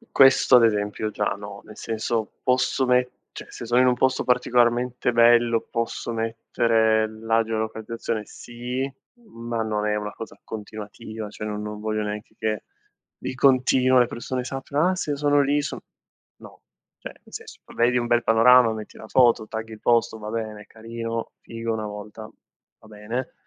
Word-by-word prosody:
Questo 135 -1 +6
ad 120 - +6
esempio 105 0 0
già 105 -1 -2
no, 100 0 -9
nel 110 - -13
senso 110 0 -3
posso 130 +1 +1
mette, 125 0 -1
se - - -8
sono 120 +2 +3
in 130 - +5
un 125 - +4
posto 130 +1 +1
particolarmente 125 0 +2
bello, 120 0 +5
posso 115 0 -3
mettere 115 -1 +1
la 115 +1 0
geolocalizzazione? 110 0 -3
Sì, 125 +5 -5 0.4
ma 115 - -4
non 105 -1 -1
è 105 - +1
una 105 0 -3
cosa 115 - -10
continuativa, 110 0 -8
cioè 105 +1 -7
no 105 -1 -3
non 105 0 -6
voglio 110 0 -2
neanche 105 +1 -6
che 110 -1 -2 0.5
di - - -5
continuo 130 -1 +4
le 120 - +4
persone 125 +2 -4
sappiano: 140 +5 -1
"Ah, 185 - +1
se 155 - -3
io 145 - 0
sono 145 0 +3
lì 145 +1 +2
so" - - -4 0.6
no, - - -15 0.4
cioè, - - -8
nel - - -23
senso, - - -9
vabbè 120 +1 +1
vi 125 - +1
un 120 - -1
bel 120 0 +3
panorama, 115 +1 +6
metti 110 -1 -8
la 110 - -10
foto, 120 -3 +4
tagghi 110 0 -6
il 110 - -10
posto, 115 -1 +2
va 105 0 -7
bene, 110 -2 -4
è - - -20
carino, 115 +1 -6
figo 115 0 -4
1 110 -1 -3
volta, 105 +1 -8 0.6
va - - -18
bene. 110 +4 -5
115 Hz, 175 wpm, -24 LUFS, 110-125 Hz, 0.6 s, Questo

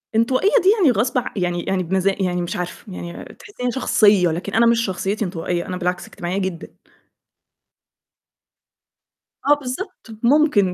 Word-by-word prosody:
انطوائية 255 - +3
دي 380 - +5
يعني 305 -9 +5
غصب 240 +3 0
ع 245 - 0
يعني 175 -2 -1
يعني 190 -1 -1
بمزا 190 +2 +1
يعني 180 -1 0
مش 175 - -4
عارفة، 180 +2 -6
يعني 170 -1 -8
تحسّيني 250 -12 -4
شخصية، 205 -7 +3
لكن 175 +5 -4
أنا 230 +2 +4
مش 230 0 +3
شخصيتي 195 +3 -2
انطوائية، 175 -1 -3
أنا 180 - -4
بالعكس 180 0 -2
اجتماعية 175 +2 -4
جدًا. 185 -3 -4 2.7
آه 290 - +6
بالضبط، 290 - -7 0.2
ممكن، 235 -8 +3
195 Hz, 145 wpm, -21 LUFS, 180-245 Hz, 2.7 s, آه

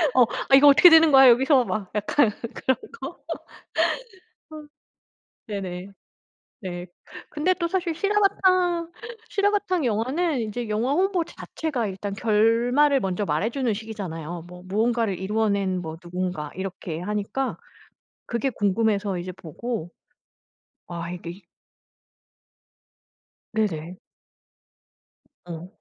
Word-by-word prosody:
어 255 - +6 0.3
'아 270 - +8
이거 290 +2 +7
어떻게 300 +5 +9
되는 320 -1 +7
거야 270 -1 +8
여기서 260 +2 +5
막.' 205 -5 -4
약간 215 +4 +2 0.3
그런 260 - +1 0.2
거. - - -7 2.3
네네. 190 -3 -5 0.7
네. 175 -2 -6 0.4
근데 320 +5 +1
또 340 -2 -2
사실 350 -2 -1
실화바탕 370 -3 +2 0.4
실화바탕 400 -5 +1
영화는 260 +7 0
이제 220 +2 -4
영화 225 +6 0
홍보 370 +1 +1
자체가 295 -8 -4
일단 195 +1 -5
결말을 235 +7 +3
먼저 190 0 -1
말해주는 225 - 0
식이잖아요. 175 -7 -6
'뭐 180 0 -11
무언가를 220 0 0
이루어낸 200 -2 0
뭐 160 -1 -6
누군가.' 180 -4 -4
이렇게 185 -3 -5
하니까 210 +7 -2 0.7
그게 235 +3 -1
궁금해서 205 -2 0
이제 180 +1 -5
보고 180 +3 -6 1.0
아 170 0 -5
이게 175 +2 -8 2.1
네네. 180 -6 -2 1.5
어 170 0 -7
220 Hz, 230 characters per minute, -24 LUFS, 185-280 Hz, 2.3 s, 어떻게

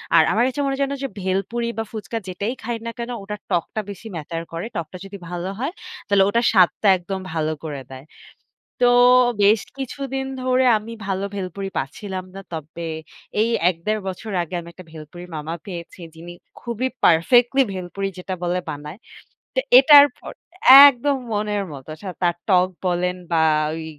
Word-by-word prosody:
আর 160 - +7
আমার 230 +3 +2
কাছে 260 +2 -4
মনে 275 -1 0
হয় 275 - -3
যেন 275 0 -2
যে, - - 0
ভেলপুরি 195 +6 -2
বা 225 - -1
ফুচকা 220 0 -5
যেটাই 200 +6 -3
খাই 235 0 -3
না 230 - -3
কেনো 240 +1 -4
ওটার 210 +1 -6
টকটা 180 +5 -1
বেশি 200 +3 -10
matter 165 +1 -5
করে। 165 +5 -4
টকটা 170 +1 -5
যদি 200 +1 -9
ভালো 175 +1 -4
হয় 275 +6 -2 0.4
তাহলে 200 -1 +4
ওটার 235 +3 +1
স্বাদটা 190 +2 +4
একদম 190 +2 -5
ভালো 155 -1 -1
করে 140 -3 -5
দেয়। 130 +2 -10 0.8
তো 245 - +6 0.6
বেশ 210 +1 +5 0.2
কিছুদিন 270 0 -4 0.2
ধরে 255 0 +2
আমি 225 +2 -8
ভালো 195 0 -1
ভেলপুরি 195 0 -5
পাচ্ছিলাম 185 +7 -5
না। 195 - -7
তবে 165 +1 -6 0.5
এই 230 - +2 0.2
১-১.৫ 200 +5 -2
বছর 190 +3 -6
আগে 170 - -11
আমি 170 - -10
একটা 185 - -13
ভেলপুরির 165 +3 -11
মামা 155 +2 -5
পেয়েছি 175 -1 -8
যিনি 170 +2 -10 0.3
খুবই 235 +2 -2 0.2
perfectly 240 +11 +4
ভেলপুরি 190 +2 -4
যেটা 185 +1 -5
বলে 175 +1 0
বানায়। 150 +4 -7 0.6
তো - - +3 0.2
এটার 285 +1 +9
পর - - -9 0.6
একদম 280 +1 +1 0.2
মনের 210 -1 -1
মতো। 135 +2 -10
সা 195 - -6
তার 175 -1 +2
টক 185 -1 +4 0.2
বলেন 180 +1 0 0.2
বা 160 -1 +3 0.3
ওই 160 0 -6
195 Hz, 170 wpm, -22 LUFS, 170-230 Hz, 0.8 s, এটার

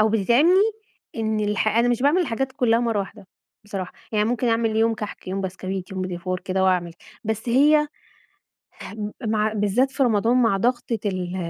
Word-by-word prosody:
أو 215 - +4
بتتعبني 295 - +4 0.5
إن 220 -1 -1
الح 210 0 0
أنا 230 +3 +2
مش 245 +1 0
باعمل 295 +6 +4
الحاجات 270 -4 -2
كلّها 240 -4 +2
مرّه 230 -3 0
واحدة 200 0 -9 0.4
بصراحة، 195 -3 -5 0.2
يعني 210 -1 +2
ممكن 245 0 0
أعمل 225 -1 +1
يوم 225 +1 +3
كحك 210 -3 -7
يوم 190 +1 -2
بسكويت 190 0 -5
يوم 190 - -4
بيتيفور 185 0 -4
كده 190 0 -1
وأعمل، 180 -2 +1 0.3
بس 220 +2 -3
هي 300 +5 +4 1.0
هم 210 0 -6
مع 215 0 +1
بالذات 215 +6 +1
في 270 - +1
رمضان 230 0 +2
مع 230 -5 +3
ضغطة 240 +1 0
ال 185 -2 -2
220 Hz, 170 wpm, -23 LUFS, 195-240 Hz, 1.0 s, أو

